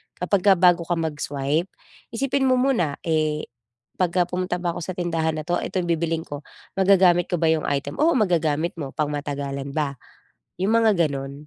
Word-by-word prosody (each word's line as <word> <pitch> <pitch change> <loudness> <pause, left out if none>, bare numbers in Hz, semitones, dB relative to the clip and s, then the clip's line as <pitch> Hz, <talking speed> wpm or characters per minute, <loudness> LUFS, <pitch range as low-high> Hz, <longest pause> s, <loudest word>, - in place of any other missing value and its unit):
kapagka 195 +2 +3
bago 175 -1 +4
ka 175 - +1
mag-swipe 150 0 -2 0.5
isipin 270 +2 0
mo 255 - +4
muna, 250 - +1
"Eh, 155 -2 0 0.5
pagka 180 0 +2
pumunta 180 0 -2
ba 175 -1 -1
ako - - -4
sa 185 - -4
tindahan 165 -3 -1
na 155 - -4
'to, 175 +3 -1
ito - - -6
yung 175 - -5
bibilhin 165 0 -1
ko, 145 -2 -7 0.4
magagamit 185 -2 +4
ko - - -1
ba 160 0 +2
yung 160 -1 0
item?" 140 - -2
Oo, 325 +1 +4
magagamit 170 - +1
mo, 140 -3 -6
pangmatagalan 140 -2 -3
ba? 140 -4 -2 0.6
Yung 190 +4 +1
mga 220 -4 +3
ganon. 135 -1 -5
170 Hz, 175 wpm, -23 LUFS, 150-185 Hz, 0.6 s, bago